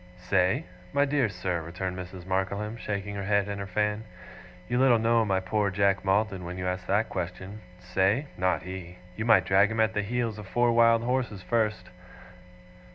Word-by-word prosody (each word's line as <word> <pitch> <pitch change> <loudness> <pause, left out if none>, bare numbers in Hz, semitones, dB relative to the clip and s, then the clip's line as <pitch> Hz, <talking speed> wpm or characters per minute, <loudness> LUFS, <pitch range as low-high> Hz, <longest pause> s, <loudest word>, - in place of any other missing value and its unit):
'Say? 90 0 +1 0.3
My 140 0 +3
dear 140 -5 +1
sir,' 90 -2 -2
returned 90 +3 -4
Mrs. 90 -1 -8
Markleham, 100 +3 -2
shaking 100 -3 -4
her 100 - -4
head 100 0 +1
and 100 -1 -4
her 100 - -5
fan, 105 +2 -1 0.6
'you 120 +4 0
little 130 -3 +5
know 115 +1 +3
my 95 -3 +1
poor 100 +2 0
Jack 100 0 +1
Maldon 95 -1 +1
when 90 +1 -6
you 90 - -4
ask 90 0 -3
that 105 +3 +2
question. 95 +3 -5 0.2
Say? 95 +9 +1
Not 90 -2 0
he. 90 -1 -8 0.2
You 110 - -3
might 115 - +5
drag 100 +2 +4
him 110 0 -3
at 110 0 +3
the 105 - 0
heels 115 0 -2
of 105 - -9
four 120 +4 +2
wild 115 0 +4
horses 120 -6 -1
first. 110 +3 -1
100 Hz, 185 wpm, -27 LUFS, 95-110 Hz, 0.6 s, little